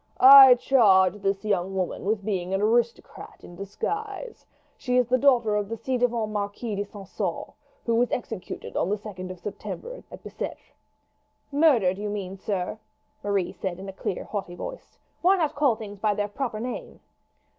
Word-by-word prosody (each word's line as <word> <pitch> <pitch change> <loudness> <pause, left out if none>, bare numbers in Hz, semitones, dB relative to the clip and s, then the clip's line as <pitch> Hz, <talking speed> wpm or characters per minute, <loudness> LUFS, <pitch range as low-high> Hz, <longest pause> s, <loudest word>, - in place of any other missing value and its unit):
"I 265 -1 +10
charge 205 -7 +4
this 195 0 -1
young 195 -2 -1
woman 185 -1 -3
with 205 -1 -1
being 190 -3 -1
an 195 - -1
aristocrat 235 +2 -1
in 175 - -12
disguise. 420 - -5 0.3
She 250 -1 -1
is 250 - +4
the 255 +1 +2
daughter 240 -6 +3
of 205 -1 -1
the 230 - -4
ci 255 +3 -2
devant 235 -3 0
Marquis 205 +2 -3
de 200 - -1
St. 200 -1 -12
Caux, - - -3 0.3
who 235 - +1
was 240 +2 +2
executed 225 -5 -5
on 175 - 0
the 205 - +1
2d 190 -3 -8
of 185 -1 -8
September 460 - -7
at - - -11
Bicetre." - - -7 0.8
"Murdered, 250 - +3
you 210 0 -3
mean, 195 -2 -4
sir," 195 +1 -3 0.4
Marie 200 -3 0
said 185 -3 -4
in 195 +1 -9
a 195 - -7
clear 190 - -4
haughty 195 -4 -5
voice. - - -9 0.2
"Why 375 +3 +4
not 315 -5 0
call 285 -5 +2
things 205 -2 -9
by 210 0 +1
their 205 0 -1
proper 230 -1 -4
name?" 245 +2 -6
210 Hz, 175 wpm, -25 LUFS, 195-250 Hz, 0.8 s, I